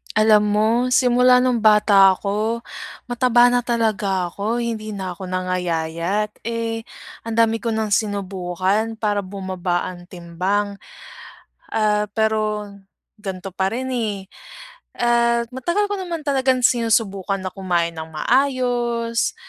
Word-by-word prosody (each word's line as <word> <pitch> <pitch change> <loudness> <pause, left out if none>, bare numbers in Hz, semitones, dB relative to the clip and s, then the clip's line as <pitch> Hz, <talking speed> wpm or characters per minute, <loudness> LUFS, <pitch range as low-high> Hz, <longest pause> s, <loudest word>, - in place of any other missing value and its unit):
Alam 215 -1 +5
mo, 210 +1 +2 0.2
simula 250 0 +5
nung 250 -3 +1
bata 205 -2 +6
ako, 210 +4 -2 0.5
mataba 245 0 +4
na 245 0 +1
talaga 215 -6 0
ako 210 +6 -3
hindi 225 -2 -3
na 190 -3 -5
ako 190 - -10
nangayayat. 180 +2 -2
Eh, 230 0 -3 0.4
ang 230 0 -2
dami 225 -1 +2
ko 230 - 0
ng 220 0 -1
sinubukan 200 +1 -1
para 205 -2 0
bumaba 185 -2 -3
ang 180 -1 -9
timbang, 185 +4 -2 1.0
ah, 210 -1 +1
pero 215 -1 0 0.5
gan'to 195 -3 -7
pa 190 0 0
rin, 260 +3 -3
eh. 220 -4 -2 0.8
At 235 0 +2
matagal 345 +11 0
ko - - 0
naman 345 -4 -4
talagang 260 -2 +1
sinusubukan 210 -5 0
na - - -2
kumain 175 -3 -1
nang 160 0 -7
maayos, 240 - 0
215 Hz, 125 wpm, -21 LUFS, 190-235 Hz, 1.0 s, bata